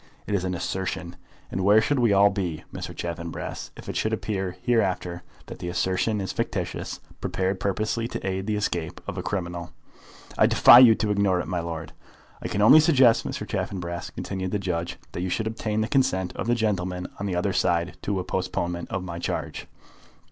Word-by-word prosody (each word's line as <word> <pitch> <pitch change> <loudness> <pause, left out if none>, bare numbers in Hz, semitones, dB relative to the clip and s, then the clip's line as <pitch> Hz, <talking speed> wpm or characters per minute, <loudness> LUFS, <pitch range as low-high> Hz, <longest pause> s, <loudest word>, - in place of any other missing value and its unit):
It 105 - -3
is 95 -3 +1
an 90 0 -1
assertion. 90 -1 -3 0.4
And 95 - -2
where 105 +3 +6
should 140 +5 +1
we 120 -3 +4
all 100 +1 +6
be, 90 -6 -3
Mr. - - -5
Chaffanbrass, 85 -1 -5
if - - -11
it - - -4
should 110 - 0
appear 95 -4 -2
hereafter 90 -6 0 0.2
that - - -9
the 90 - -5
assertion 95 +4 0
is 95 - -3
fictitious, - - -3 0.2
prepared 95 0 -1
purposely 110 +3 -1
to 120 - -5
aid 95 +1 -2
the 105 - 0
escape 85 -6 -2
of - - -5
a - - -1
criminal?" 85 -3 -4 0.7
"I - - +7
defy 120 - +9
you 120 -3 +8
to 105 -1 -1
ignore 100 -3 +2
it, - - -3
my 90 -2 -1
lord." 85 -1 -5 0.5
"I - - -3
can 105 - 0
only 150 +8 +9
suggest, 135 -7 +5
Mr. - - -4
Chaffanbrass," 85 -2 -3
continued 95 -1 -4
the 105 - 0
judge, 85 -3 -3
"that 85 - -5
you 90 - -1
should 110 +5 -1
obtain 110 -1 -2
the 110 - 0
consent 95 -10 +1
of - - -4
the 120 - +3
gentlemen 90 -5 -1
on 100 - -2
the 95 - -2
other 95 +2 0
side 85 -1 +1
to 100 -2 -1
a - - -2
postponement 90 -2 -3
of 95 -1 -3
my 85 -2 -6
charge." - - -4
95 Hz, 200 wpm, -25 LUFS, 90-105 Hz, 0.7 s, defy